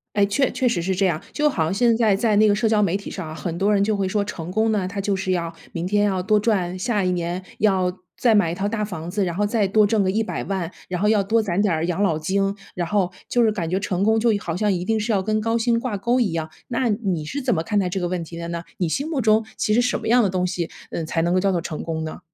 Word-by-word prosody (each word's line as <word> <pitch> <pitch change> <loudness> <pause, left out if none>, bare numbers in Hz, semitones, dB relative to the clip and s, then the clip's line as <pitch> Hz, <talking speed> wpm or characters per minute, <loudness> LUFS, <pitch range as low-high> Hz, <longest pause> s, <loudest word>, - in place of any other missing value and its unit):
诶， 205 - +4
确 265 +6 +1
确 255 0 0
实 235 - +1
是 190 +2 -1
这 190 +1 +2
样。 160 -4 0
就 300 0 +2
好 170 - 0
像 160 +4 -1
现 230 +2 +3
在 220 -4 +3
在 215 +1 +1
那 215 +1 +5
个 205 - +4
社 215 +2 +1
交 215 -1 +3
媒 190 -1 +1
体 200 - -5
上 185 -5 -6
啊， 155 - -7
很 170 0 -4
多 200 +3 +2
人 200 0 +3
就 215 0 +1
会 195 -1 0
说 200 +2 0
成 175 -4 -6
功 220 +3 +2
呢， 195 -4 0
它 200 +1 -4
就 200 0 0
是 190 0 -2
要 170 -2 -1 0.2
明 170 +2 -3
天 205 +1 +2
要 190 -2 0
多 210 +2 +3
赚， 185 -5 0
下 205 0 0
一 180 - +1
年 175 +1 -2 0.2
要 190 -3 +2 0.3
再 235 -3 +4
买 175 -6 +3
一 170 - -3
套 200 +2 -1
大 210 -1 -1
房 175 -4 -6
子， 200 +1 0
然 175 -2 -3
后 205 - 0
再 210 -2 +1
多 210 +1 +4
挣 210 -2 +2
个 185 - +1
1000000， 195 -4 -2 0.2
然 180 -1 -3
后 210 - +3
要 210 -3 +3
多 225 +3 +2
攒 195 -3 -1
点 170 -5 +1
养 180 +3 0
老 165 -6 +1
金， 195 +4 0 0.2
然 175 -2 -2
后， 200 -3 +1 0.2
就 245 - +2
是 220 - +3
感 180 -6 -3
觉 185 +3 0
成 190 -1 -1
功 220 +2 +3
就 235 +1 +2
好 165 -3 -4
像 210 +2 +1
一 180 -1 -1
定 220 +1 +1
是 220 +2 -1
要 195 -2 +2
跟 215 +1 0
高 225 +1 +1
薪 230 0 +2
挂 235 -4 -3
钩 240 +6 +1
一 220 -8 +1
样。 160 -1 -2 0.2
那 245 -1 0
你 195 -8 -1
是 280 - -4
怎 255 -2 +1
么 160 - -1
看 210 +4 0
待 185 -2 0
这 190 - -2
个 175 - -1
问 175 -1 -2
题 165 +1 -9
的 170 - -5
呢？ 170 0 -3 0.2
你 175 - 0
心 280 - -2
目 300 - -1
中 220 -1 +3
其 215 - +1
实 240 - +4
什 245 - 0
么 - - -6
样 245 +1 +5
的 205 - +2
东 180 0 0
西， 175 -2 -2 0.2
嗯， 165 - -3
才 165 +1 0
能 175 +1 +1
够 185 - +3
叫 195 +1 +2
做 175 - 0
成 160 -1 -5
功 160 -1 -3
呢？ 155 - -6
200 Hz, 325 characters per minute, -22 LUFS, 180-215 Hz, 0.3 s, 那